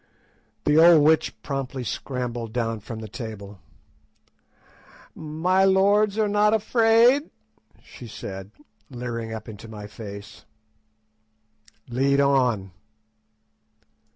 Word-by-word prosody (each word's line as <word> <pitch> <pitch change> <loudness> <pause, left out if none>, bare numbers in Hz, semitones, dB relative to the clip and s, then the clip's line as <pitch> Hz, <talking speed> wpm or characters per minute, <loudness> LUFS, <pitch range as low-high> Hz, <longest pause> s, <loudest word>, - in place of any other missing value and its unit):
The 150 +1 +4
old 165 -2 +7
witch 160 +1 +2
promptly 135 -2 -4
scrambled 120 -2 -4
down 115 -2 -2
from 110 +2 -8
the 110 - -7
table. 105 -4 -8 1.5
"My 165 +5 0
lords 200 +2 +3
are 215 -1 +2
not 210 +1 +3
afraid?" 230 +5 +3 0.5
she 120 - -12
said, 95 -2 -8 0.4
leering 120 -3 -5
up 110 -1 -7
into 110 0 -10
my 105 -2 -9
face. 105 -1 -10 1.4
"Lead 135 +3 +1
on." 125 -9 +2
130 Hz, 100 wpm, -24 LUFS, 110-185 Hz, 1.5 s, old